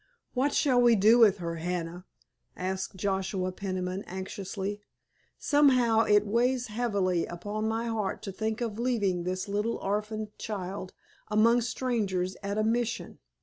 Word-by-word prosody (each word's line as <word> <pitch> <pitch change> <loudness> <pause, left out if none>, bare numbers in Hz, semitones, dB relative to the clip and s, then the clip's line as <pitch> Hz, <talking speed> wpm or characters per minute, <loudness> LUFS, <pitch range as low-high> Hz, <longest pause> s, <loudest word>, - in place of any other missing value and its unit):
"What 270 +3 +1
shall 255 -5 +3
we 240 -1 +6
do 220 +4 +6
with 210 -4 +6
her, 170 -2 -4
Hannah?" 175 +1 -4 0.5
asked 190 +1 -3
Joshua 190 -1 -1
Peniman 185 0 -3
anxiously. 195 +2 -5 0.6
"Somehow 250 -6 +4
it 210 0 +4
weighs 245 +3 +1
heavily 200 -6 0
upon 205 +5 -4
my 225 +1 -1
heart 220 -4 -2
to 195 - -4
think 220 +4 -3
of 225 -2 -3
leaving 205 -8 0
this 185 +1 -2
little 210 +3 -1
orphaned 210 +1 -3
child 190 -2 -5 0.4
among 230 +3 +4
strangers 210 -7 -1
at 200 0 -3
a 215 - +2
Mission. 230 +1 -1
210 Hz, 140 wpm, -29 LUFS, 190-230 Hz, 0.6 s, we